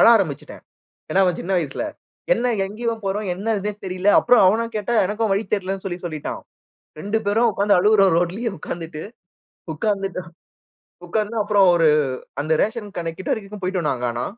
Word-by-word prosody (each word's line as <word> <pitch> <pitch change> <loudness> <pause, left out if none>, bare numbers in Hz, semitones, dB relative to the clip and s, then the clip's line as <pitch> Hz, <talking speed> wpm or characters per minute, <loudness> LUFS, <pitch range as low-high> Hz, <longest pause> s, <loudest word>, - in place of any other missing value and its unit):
அழ - - +7
ஆரம்பிச்சுட்டேன். 155 -9 -3 0.5
ஏன்னா 195 - +4
அவன் 180 -2 0
சின்ன 190 - -3
வயசுல, 160 - -3 0.5
என்ன 245 0 0
எங்கேயோ 230 +3 -3
போறோம்? 200 +2 -2
என்ன 210 +5 -2
இதுன்னு 210 +1 -5
தெரியல. 185 +2 -1
அப்புறம் 245 -4 +5
அவன 225 +5 +3
கேட்டால 220 +2 +1
எனக்கும் 215 +1 -1
வழி 200 +3 0
தெரியலன்னு, 195 0 -4
சொல்லி 175 -1 -4
சொல்லிட்டான். 155 -3 -5 0.6
2 205 +6 -1
பேரும் 225 +4 +3
உட்கார்ந்து 200 +1 +3
அழுறோம். 195 -2 +5
ரோட்லயே 195 +7 -1
உட்கார்ந்துட்டு. 160 0 -6 0.7
உட்கார்ந்துட்டோம். 195 -1 -2 0.8
உட்கார்ந்து 215 +4 -2
அப்புறம் 205 -2 +4
ஒரு 165 -2 +4 0.5
அந்த 155 - -1
ரேஷன் 215 -2 -3
கடைக்கு 165 -1 -4
கிட்ட - - -1
வரைக்கும் 205 -1 -9
போய்ட்டோம் 180 -4 -1
நாங்க 125 -1 -3
ஆனா. 120 +1 -3
195 Hz, 160 wpm, -22 LUFS, 175-215 Hz, 0.8 s, அழ